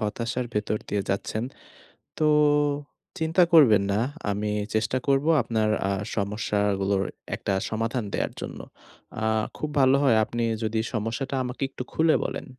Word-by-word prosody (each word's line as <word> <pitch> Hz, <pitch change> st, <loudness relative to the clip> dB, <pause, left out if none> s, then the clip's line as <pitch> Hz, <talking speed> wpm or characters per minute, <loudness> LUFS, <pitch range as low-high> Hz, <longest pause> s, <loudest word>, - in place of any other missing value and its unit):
হতাশার 115 Hz, +3 st, -2 dB
ভেতর 105 Hz, 0 st, 0 dB
দিয়ে 100 Hz, -1 st, 0 dB
যাচ্ছেন। 105 Hz, +3 st, -2 dB, 0.7 s
তো 155 Hz, -, +1 dB, 0.9 s
চিন্তা 160 Hz, +3 st, +3 dB
করবেন 115 Hz, -11 st, +7 dB
না। 100 Hz, -, +1 dB, 0.3 s
আমি 105 Hz, +1 st, -2 dB, 0.2 s
চেষ্টা 110 Hz, +4 st, +1 dB
করব 140 Hz, +1 st, +3 dB, 0.2 s
আপনার 110 Hz, -2 st, 0 dB, 0.2 s
আ -, -, +1 dB, 0.2 s
সমস্যাগুলোর 100 Hz, -1 st, 0 dB, 0.3 s
একটা 100 Hz, -, -2 dB, 0.2 s
সমাধান 115 Hz, +2 st, -1 dB
দেয়ার -, -, -1 dB
জন্য। -, -, -6 dB, 0.6 s
আ -, -, +1 dB, 0.3 s
খুব 150 Hz, -, -3 dB
ভালো 130 Hz, 0 st, +5 dB
হয় 120 Hz, -5 st, +4 dB
আপনি 120 Hz, +2 st, -3 dB, 0.2 s
যদি 110 Hz, 0 st, 0 dB
সমস্যাটা 120 Hz, +5 st, -2 dB
আমাকে 125 Hz, +1 st, -6 dB
একটু 130 Hz, -, -6 dB
খুলে 160 Hz, 0 st, +4 dB
বলেন। -, -, -4 dB
110 Hz, 140 wpm, -26 LUFS, 105-130 Hz, 0.9 s, করবেন